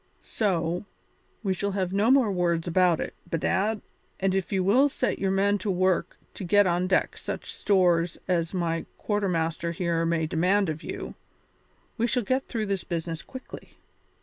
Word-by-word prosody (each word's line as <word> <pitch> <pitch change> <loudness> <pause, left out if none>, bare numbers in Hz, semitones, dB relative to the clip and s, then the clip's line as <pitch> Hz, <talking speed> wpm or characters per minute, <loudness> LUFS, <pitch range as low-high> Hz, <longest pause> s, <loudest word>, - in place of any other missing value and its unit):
So, 175 -3 -1 0.6
we 195 -2 +1
shall 200 +2 -2
have 190 -2 -1
no 205 +4 +3
more 260 -5 +5
words 175 -2 0
about 175 -1 +3
it, - - -4 0.2
bedad, 195 +6 0 0.4
and 195 0 +1
if 195 +1 -1
you 190 -2 +1
will 250 +10 +4
set 255 - -1
your 195 - +1
men 200 +2 +2
to 200 - -3
work 185 -1 +1 0.2
to - - -7
get 205 +3 +4
on 180 0 +1
deck 185 - +1
such - - -6
stores 175 -4 +2
as 170 -3 +1
my 170 -3 -1
quarter 205 -2 -1
master 165 0 -1
here 170 -1 0
may 165 -1 +1
demand 180 +4 +2
of 155 0 -4
you, - - -6 0.9
we 235 - +3
shall 245 0 0
get 260 +5 0
through 225 -3 -2
this 195 -2 -2
business 165 -2 -3
quickly. 260 0 -11
185 Hz, 175 wpm, -27 LUFS, 170-205 Hz, 0.9 s, more